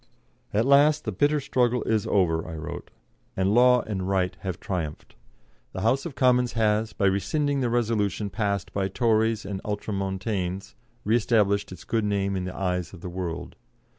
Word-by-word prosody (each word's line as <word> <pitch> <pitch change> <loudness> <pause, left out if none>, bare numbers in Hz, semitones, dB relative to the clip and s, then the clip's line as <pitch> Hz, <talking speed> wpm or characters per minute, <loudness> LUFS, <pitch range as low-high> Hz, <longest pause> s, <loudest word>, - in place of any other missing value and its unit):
"At 110 +3 +1
last 145 +2 +4
the 110 - -1
bitter 145 +10 +2
struggle 125 -2 +1
is 110 -2 0
over," 85 -5 +2
I 80 - -6
wrote, 80 -1 -7 0.5
"and 95 +2 +2
law 125 +1 +6
and 95 -3 -4
right 95 -2 0
have 95 -3 -5
triumphed. 80 -6 -5 0.6
The 95 - -4
House 130 - +1
of 145 - -10
Commons 125 -2 +3
has, 110 -1 +1
by 100 - -1
rescinding 140 - +1
the 125 - +1
resolution 110 -3 0
passed 100 -4 -2
by 95 -1 0
Tories 110 0 +1
and 95 -1 -4
Ultramontanes, 95 -2 -3 0.3
re 110 +3 +2
established 105 -4 +2
its 90 - -10
good 115 -2 -1
name 100 -1 0
in 90 -1 -2
the 90 - -6
eyes 90 -2 -2
of 90 - -11
the 90 - -6
world. 85 -1 -5
105 Hz, 170 wpm, -26 LUFS, 95-120 Hz, 0.6 s, law